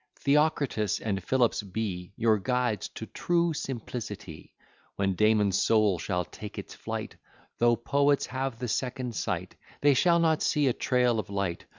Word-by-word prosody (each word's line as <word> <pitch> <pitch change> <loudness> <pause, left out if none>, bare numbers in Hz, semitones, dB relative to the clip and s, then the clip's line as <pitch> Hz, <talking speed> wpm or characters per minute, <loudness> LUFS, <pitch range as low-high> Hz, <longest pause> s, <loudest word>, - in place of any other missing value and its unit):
Theocritus 140 - +1
and 95 -4 -2
Philips 125 -1 +2
be 95 -3 -4
Your 110 -2 +3
guides 125 -2 0
to 110 - -5
true 170 +6 0
simplicity. 110 - -6 0.4
When 100 -1 0
Damon's 105 -1 +3
soul 105 -5 +3
shall 90 +1 -1
take 105 +2 -9
its - - -7
flight, - - -6 0.4
Though 120 0 +4
poets 140 +4 +2
have 130 -1 -3
the 125 - -4
second 125 +2 -2
sight, - - -3 0.2
They 145 0 +5
shall 170 +5 +4
not 160 -2 +2
see 150 -1 +2
a 125 - +3
trail 125 -3 +1
of 100 - -5
light. 100 -4 -2
115 Hz, 155 wpm, -28 LUFS, 100-135 Hz, 0.4 s, They